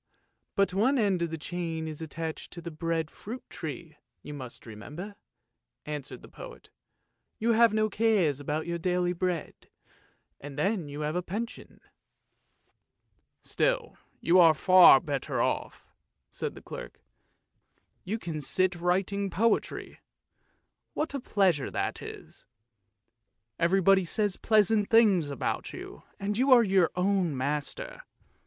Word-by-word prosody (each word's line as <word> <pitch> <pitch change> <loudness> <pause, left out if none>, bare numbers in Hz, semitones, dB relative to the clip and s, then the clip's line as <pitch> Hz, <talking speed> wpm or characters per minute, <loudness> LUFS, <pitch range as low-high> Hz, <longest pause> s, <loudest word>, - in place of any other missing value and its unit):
but 200 -1 +2
one 240 +9 +2
end 200 -6 +1
of 170 - 0
the 160 - -4
chain 165 -1 -4
is 155 0 -7
attached 160 0 -5
to 175 - -8
the 170 0 -7
bread 160 0 -2
fruit 240 +5 -9
tree, 160 0 -7 0.3
you 150 - -8
must 130 -4 -9
remember," 150 - -8 0.7
answered 150 -2 -6
the - - -11
poet. - - -12 0.3
" - - -52
You 230 +2 +2
have 230 0 +5
no 215 0 +2
cares 200 - +2
about 150 +2 -3
your 170 0 -3
daily 180 0 0
bread, 180 -1 -4 0.7
and 145 0 -9
then 180 -1 0
you 145 +1 -6
have 150 +2 -2
a 180 - 0
pension." 220 +7 -6 1.6
"Still - - 0 0.2
you 180 +2 +4
are 165 -3 +7
far 185 -4 +8
better 140 -4 -3
off! - - -2 0.3
" - - -54
said - - -4
the - - -12
clerk; - - -9 1.0
"you 205 +5 -2
can 165 -8 -5
sit 185 +5 +1
writing 190 +3 0
poetry, 220 +6 -1 1.0
what 305 -1 -2
a 280 - -2
pleasure 190 - +1
that - - -3
is. - - -11 1.1
Everybody 190 +2 +4
says 205 +2 0
pleasant 215 -1 +2
things 210 -8 +5
to 140 - -2
you, - - -10 0.2
and 205 +2 -2
you 265 +2 +3
are 245 -2 +8
your 190 -5 +3
own 180 -5 +1
master. 150 - -3
180 Hz, 140 wpm, -28 LUFS, 160-210 Hz, 1.6 s, far